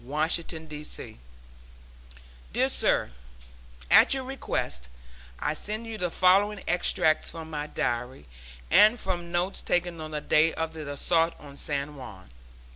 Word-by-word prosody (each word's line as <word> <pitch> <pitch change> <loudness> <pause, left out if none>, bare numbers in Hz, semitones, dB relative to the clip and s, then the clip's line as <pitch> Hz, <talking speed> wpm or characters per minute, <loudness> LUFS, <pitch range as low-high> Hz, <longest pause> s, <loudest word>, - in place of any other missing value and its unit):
Washington, 160 +4 0
D. 150 -1 -8
C. 150 - -6 1.3
DEAR - - +2
SIR: - - +1 0.8
At - - +7
your 265 - -3
request, 65 - -3 0.5
I 150 - -1
send 215 +7 -5
you 225 -1 -6
the 180 -1 0
following 195 +4 +3
extracts 175 -2 +2
from 160 -1 -8
my 150 -1 -4
diary, 120 - -3 0.5
and 215 +3 +6
from 175 -3 -4
notes 175 +2 -1
taken 175 -2 -1
on 155 - -6
the 150 -1 -3
day 155 +2 +3
of 160 0 -3
the 155 -3 -6
assault 165 +3 +1
on 140 -1 -12
San 145 +1 -3
Juan. 100 - -11
160 Hz, 140 wpm, -27 LUFS, 150-180 Hz, 1.3 s, At